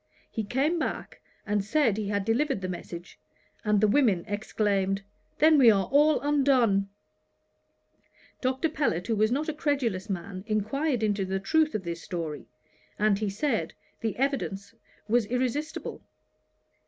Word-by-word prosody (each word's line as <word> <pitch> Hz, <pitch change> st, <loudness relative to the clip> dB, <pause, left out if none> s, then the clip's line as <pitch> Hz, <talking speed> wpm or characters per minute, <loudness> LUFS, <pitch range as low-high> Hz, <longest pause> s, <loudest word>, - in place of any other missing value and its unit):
He 220 Hz, -, -2 dB
came 275 Hz, -, 0 dB
back, -, -, -4 dB, 0.2 s
and 210 Hz, -1 st, 0 dB
said 230 Hz, 0 st, +2 dB
he 215 Hz, -1 st, -3 dB
had 200 Hz, -1 st, -1 dB
delivered 245 Hz, 0 st, +1 dB
the 185 Hz, -, -3 dB
message, 175 Hz, -1 st, -8 dB, 0.4 s
and 210 Hz, -1 st, +3 dB
the 215 Hz, -, +4 dB
women 205 Hz, -7 st, +3 dB
exclaimed, 200 Hz, -2 st, 0 dB, 0.3 s
"Then 310 Hz, 0 st, +6 dB
we 245 Hz, -4 st, +8 dB
are 195 Hz, -3 st, +3 dB
all 295 Hz, +2 st, +5 dB
undone!" 260 Hz, -9 st, +3 dB, 1.5 s
Dr. 260 Hz, +4 st, +1 dB
Pellet, 280 Hz, -, -1 dB
who 225 Hz, -, 0 dB
was 215 Hz, +2 st, +2 dB
not 290 Hz, +5 st, 0 dB
a 315 Hz, -, -1 dB
credulous 260 Hz, -, -1 dB
man, 185 Hz, 0 st, -5 dB
inquired 225 Hz, +5 st, 0 dB
into 205 Hz, -2 st, +1 dB
the 190 Hz, 0 st, -2 dB
truth 310 Hz, +9 st, +2 dB
of 210 Hz, -, -2 dB
this 170 Hz, -1 st, -5 dB
story, 165 Hz, -5 st, -5 dB, 0.5 s
and 210 Hz, -1 st, +2 dB
he 215 Hz, -2 st, -1 dB
said, 225 Hz, +4 st, -1 dB, 0.2 s
the 225 Hz, -2 st, -2 dB
evidence 245 Hz, -7 st, -2 dB, 0.3 s
was 230 Hz, -1 st, +2 dB
irresistible. 255 Hz, +6 st, -2 dB
215 Hz, 145 wpm, -27 LUFS, 195-275 Hz, 1.5 s, we